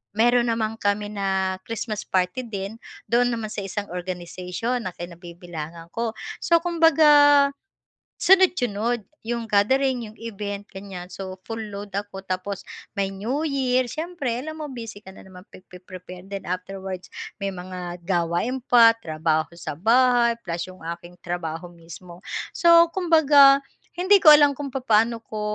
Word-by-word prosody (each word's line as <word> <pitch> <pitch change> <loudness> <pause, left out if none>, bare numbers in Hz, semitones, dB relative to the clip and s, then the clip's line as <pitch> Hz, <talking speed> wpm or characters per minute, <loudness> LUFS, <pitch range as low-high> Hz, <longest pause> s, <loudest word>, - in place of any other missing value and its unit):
meron 240 +2 +3
naman 225 -1 -1
kami 205 +1 -1
na 190 -2 -1
Christmas 225 -2 -4
party 185 +7 -1
din, 200 +1 -6 0.3
doon 245 +1 +3
naman 215 -2 -5
sa - - -4
isang 200 +1 -4
organization 180 +6 -4
na - - -4
kinabibilangan 170 -1 -9
ko. 230 -1 -2 0.2
So 335 0 +3
kumbaga, 295 -4 +5 0.7
sunod-sunod 245 - +3 0.2
yung 235 -1 -2
gathering, 245 +3 +2
yung - - -22
event 205 -2 -5
ganyan 190 -2 -8
so 190 -1 -7
full 225 0 -5
load 205 -2 -7
ako 200 -1 -5
tapos 190 +1 -4 0.3
may 195 -1 0
New 245 +11 -2
Year 260 -3 +1
siyempre 310 -8 -3
alam 315 +3 -7
mo 300 - -4
busy 225 -4 -8
ka 190 - -11
na - - -14
naman 185 0 -13
pagpe-prepare 180 0 -12
din, 195 0 -7
afterwards 185 0 -5 0.3
may 195 -1 -2
mga 180 -1 -7
gawain 175 +9 0
pa, 230 -2 +6
trabaho 155 -4 -1
sa 155 -4 -6
bahay, 240 +4 +4
plus 170 -1 -4
yung 185 0 -13
aking 170 +1 -7
trabaho 175 -1 -5
mismo. 170 +1 -13 0.4
So 335 -1 +6
kumbaga, 290 -6 +6 0.4
hindi 380 +3 +5
ko 305 -3 +10
alam 290 -2 +6
kung 280 -3 -6
papaano 230 -2 +2
ko 215 -1 -7
205 Hz, 145 wpm, -24 LUFS, 185-250 Hz, 0.7 s, ko